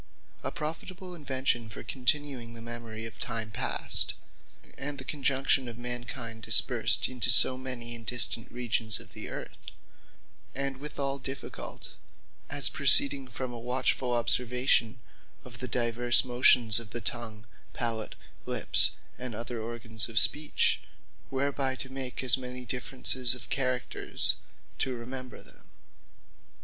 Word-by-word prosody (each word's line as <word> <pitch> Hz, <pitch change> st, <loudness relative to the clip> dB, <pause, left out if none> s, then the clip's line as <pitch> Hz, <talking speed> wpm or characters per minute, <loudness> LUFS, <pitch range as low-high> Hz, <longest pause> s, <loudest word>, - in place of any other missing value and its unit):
A -, -, -4 dB
profitable 175 Hz, +5 st, -7 dB
Invention 130 Hz, -7 st, -3 dB
for 105 Hz, -, -11 dB
continuing 125 Hz, 0 st, -2 dB
the -, -, -6 dB
memory 115 Hz, -1 st, -8 dB
of 115 Hz, -, -11 dB
time 115 Hz, -5 st, -4 dB
past, -, -, +1 dB, 0.6 s
and 140 Hz, +1 st, -6 dB
the 130 Hz, -, -9 dB
conjunction 135 Hz, -2 st, -1 dB
of 115 Hz, -1 st, -9 dB
mankind, 120 Hz, -1 st, -6 dB
dispersed -, -, +5 dB
into 125 Hz, -1 st, -2 dB
so 125 Hz, +1 st, +8 dB
many, 125 Hz, -2 st, -6 dB
and 115 Hz, -1 st, -7 dB
distant 120 Hz, 0 st, +1 dB
regions 115 Hz, -3 st, +2 dB
of -, -, -13 dB
the -, -, -8 dB
Earth; -, -, -10 dB, 0.9 s
and 135 Hz, 0 st, -4 dB
with 150 Hz, +3 st, -9 dB
all 140 Hz, -1 st, -3 dB
difficult, 135 Hz, 0 st, -9 dB, 0.5 s
as -, -, 0 dB
proceeding 140 Hz, -1 st, +6 dB
from 125 Hz, 0 st, -7 dB
a 120 Hz, -, -8 dB
watchfull 125 Hz, 0 st, -2 dB
observation 125 Hz, 0 st, -1 dB, 0.5 s
of 125 Hz, -2 st, -13 dB
the 125 Hz, -, -6 dB
divers 120 Hz, +1 st, +4 dB
motions 120 Hz, -2 st, +4 dB
of 115 Hz, -2 st, -9 dB
the 120 Hz, -, -6 dB
Tongue, 115 Hz, -2 st, -5 dB, 0.3 s
Palat, 115 Hz, -3 st, -4 dB, 0.3 s
Lips, -, -, +4 dB, 0.2 s
and 125 Hz, -3 st, -6 dB
other 115 Hz, +1 st, -7 dB
organs 115 Hz, -1 st, -2 dB
of 115 Hz, -, -9 dB
Speech; 150 Hz, +5 st, +1 dB, 0.5 s
whereby 135 Hz, 0 st, -3 dB
to 130 Hz, -, -8 dB
make 130 Hz, -1 st, -6 dB
as 130 Hz, 0 st, +5 dB
many 125 Hz, 0 st, -9 dB
differences 125 Hz, 0 st, +3 dB
of 125 Hz, -, -12 dB
characters, 130 Hz, -2 st, +2 dB, 0.4 s
to 130 Hz, -1 st, -3 dB
remember 125 Hz, 0 st, -9 dB
them. -, -, -17 dB
125 Hz, 135 wpm, -27 LUFS, 115-130 Hz, 0.9 s, so